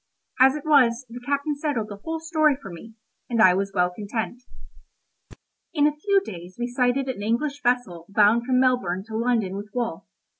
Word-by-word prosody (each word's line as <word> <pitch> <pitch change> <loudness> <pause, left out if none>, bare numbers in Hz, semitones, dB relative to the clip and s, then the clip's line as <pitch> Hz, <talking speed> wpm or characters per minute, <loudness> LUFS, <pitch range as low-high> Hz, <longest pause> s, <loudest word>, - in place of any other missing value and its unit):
As 265 +2 +6
it 300 - -7
was, 260 -5 +4
the 245 - -7
captain 285 +1 0
settled 280 -8 -2
the 205 - -7
whole 320 +10 -5
story 315 -3 +2
for 195 -9 -10
me, 220 +7 -11 0.3
and 235 -2 -1
I 185 -4 +7
was 195 +1 -1
well 180 -2 +1
content. 220 +5 -5 1.3
In 295 -1 +3
a 300 0 +2
few 395 +5 +2
days 175 0 -9
we 240 - -2
sighted 250 +2 0
an 255 -6 -4
English 275 +7 -1
vessel 240 -10 -1
bound 215 +4 +3
from 255 -1 +3
Melbourne 245 -8 +1
to 220 - -6
London 225 -5 0
with 205 +1 -7
wool. 235 -2 -3
240 Hz, 185 wpm, -24 LUFS, 205-280 Hz, 1.3 s, I